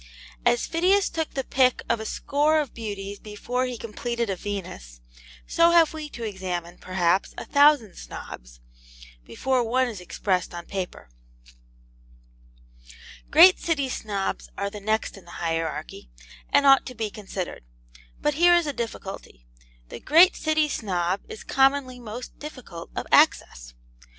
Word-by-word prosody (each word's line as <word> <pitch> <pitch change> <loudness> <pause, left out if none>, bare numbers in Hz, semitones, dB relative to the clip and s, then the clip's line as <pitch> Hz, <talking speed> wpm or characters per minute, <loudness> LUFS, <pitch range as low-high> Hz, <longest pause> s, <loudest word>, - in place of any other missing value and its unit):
As 240 - +3
Phidias 370 +4 +2
took 320 -1 -3
the 270 - -1
pick 255 -1 +2
of 235 - +1
a 220 - -5
score 300 +2 +1
of 290 -5 -3
beauties 205 -3 -6
before 245 +4 -3
he 250 -1 -5
completed 235 0 -3
a - - -1
Venus, 175 - -7 0.5
so 335 0 +4
have 335 -2 +5
we 310 -1 -6
to 235 - -8
examine, 180 -4 -5
perhaps, 185 0 0
a - - -6
thousand 285 -8 +4
Snobs, - - -10 0.6
before 260 - 0
one 255 +3 +1
is 215 -6 -7
expressed 180 0 -2
upon 175 0 -7
paper. 185 - -6 2.2
Great 350 +5 +8
City 300 -5 0
Snobs 200 -5 -3
are 200 0 -2
the 210 - -7
next 215 +1 -1
in 195 - -15
the 175 - -11
hierarchy, 160 - -3 0.4
and 280 - +3
ought 270 -1 +6
to 255 - -8
be 220 -2 -3
considered. 195 - -6 0.6
But 295 - +1
here 350 +4 +5
is 345 -1 +2
a 290 - -2
difficulty. 195 - -7 0.4
The - - -8
great 340 - +6
City 310 -1 +1
Snob 185 -7 -1
is 445 +1 -8
commonly 270 - +2
most 240 +1 -8
difficult 255 - -9
of - - -3
access. - - +3
230 Hz, 145 wpm, -25 LUFS, 190-285 Hz, 2.2 s, Great